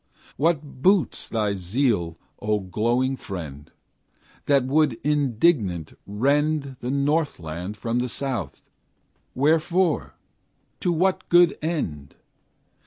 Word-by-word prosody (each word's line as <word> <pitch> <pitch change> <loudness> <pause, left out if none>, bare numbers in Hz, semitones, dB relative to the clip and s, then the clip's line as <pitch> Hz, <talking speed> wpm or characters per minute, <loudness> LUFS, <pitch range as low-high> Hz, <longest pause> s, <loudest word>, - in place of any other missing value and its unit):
What 145 -3 -1
boots 190 +1 +2
thy 105 -3 0
zeal, 95 -3 0 0.2
O 105 0 0
glowing 120 +8 0
friend, 75 - -8 0.8
That 140 -2 +4
would 145 0 +3
indignant 125 - +1
rend 140 +5 0
The 125 - -4
northland 130 - -1
from 115 +3 -1
the 125 0 -1
south? 135 0 -3 0.7
Wherefore? 160 +4 +1 0.6
to 175 - 0
what 185 +3 0
good 175 -2 +6
end? 80 - -3
130 Hz, 100 wpm, -24 LUFS, 105-155 Hz, 0.8 s, good